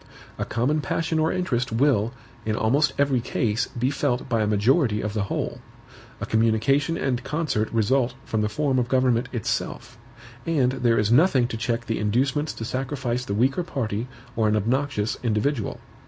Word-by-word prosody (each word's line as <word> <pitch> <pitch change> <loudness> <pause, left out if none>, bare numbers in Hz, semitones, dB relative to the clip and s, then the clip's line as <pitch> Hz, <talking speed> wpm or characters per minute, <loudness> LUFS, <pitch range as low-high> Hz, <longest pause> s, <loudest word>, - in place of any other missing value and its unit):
A - - -1
common 135 +7 0
passion 160 +2 -1
or 160 +1 +2
interest 130 -10 -1
will, 115 -2 +2 0.3
in 110 0 -1
almost 135 +7 +2
every 140 -3 +2
case, 115 0 -1
be 125 +3 -1
felt 140 -3 -1
by 115 -4 +1
a 105 - +1
majority 105 +3 +2
of 105 -1 -3
the 105 -2 -1
whole; - - -3 0.6
a - - -3
communication 115 +8 +2
and 125 -2 -1
concert 150 -9 -1
result 120 +3 +1
from 110 - -1
the 105 - 0
form 135 +3 +1
of 120 - 0
government 125 -2 +2
itself; 115 -1 -3 0.4
and 140 -7 +2
there 120 -3 +1
is 105 +1 +2
nothing 130 -2 +4
to 115 - -4
check 115 +1 -2
the 115 -1 -2
inducements 130 +8 +1
to 115 - -6
sacrifice 130 -1 -2
the 100 - -2
weaker 130 - +2
party 120 -8 -3 0.3
or 110 -1 +2
an 105 - +2
obnoxious 120 +1 0
individual. 115 +1 -1
125 Hz, 170 wpm, -24 LUFS, 110-140 Hz, 0.6 s, nothing